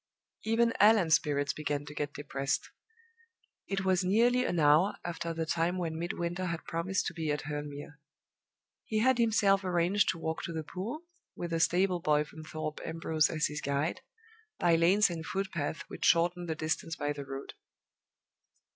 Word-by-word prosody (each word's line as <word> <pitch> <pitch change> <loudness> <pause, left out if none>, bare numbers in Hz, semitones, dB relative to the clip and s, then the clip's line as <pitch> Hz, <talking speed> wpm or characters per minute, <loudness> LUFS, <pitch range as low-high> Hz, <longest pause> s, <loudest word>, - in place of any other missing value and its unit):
Even 230 +1 +2
Allan's 205 -6 +5
spirits 145 -2 +2
began 145 -1 -3
to 150 - -9
get 145 -1 -3
depressed. 140 -1 -2 1.0
It 195 -1 -2
was 185 -1 +2
nearly 240 +6 +3
an 175 - 0
hour 150 +6 +4
after 170 -1 -3
the 165 0 -2
time 170 +3 0
when 165 -3 -3
Midwinter 175 +1 -3
had 170 -2 -4
promised 175 +4 -1
to - - -3
be 160 -2 -3
at 150 - -1
Hurle 145 0 -4
Mere. 145 +1 -10 0.8
He 220 - -2
had 250 +3 +3
himself 205 -4 +3
arranged 180 +2 +2
to 165 - 0
walk 160 0 -3
to 170 - -5
the 160 -1 -3
pool 215 - -6 0.3
(with 170 -1 -4
a 165 - +1
stable 180 +2 +2
boy 150 -3 +2
from 155 +1 -11
Thorpe 155 -1 -5
Ambrose 160 -2 +1
as 155 -2 0
his 150 - -3
guide), 140 - -1 0.6
by 170 -1 +3
lanes 185 +4 +4
and 165 -2 -5
footpaths 170 -5 -3
which - - -8
shortened 175 0 +3
the 160 - -1
distance 160 +1 -2
by 145 0 -2
the 145 -1 -6
road. 135 0 -7
165 Hz, 175 wpm, -31 LUFS, 150-185 Hz, 1.0 s, Allan's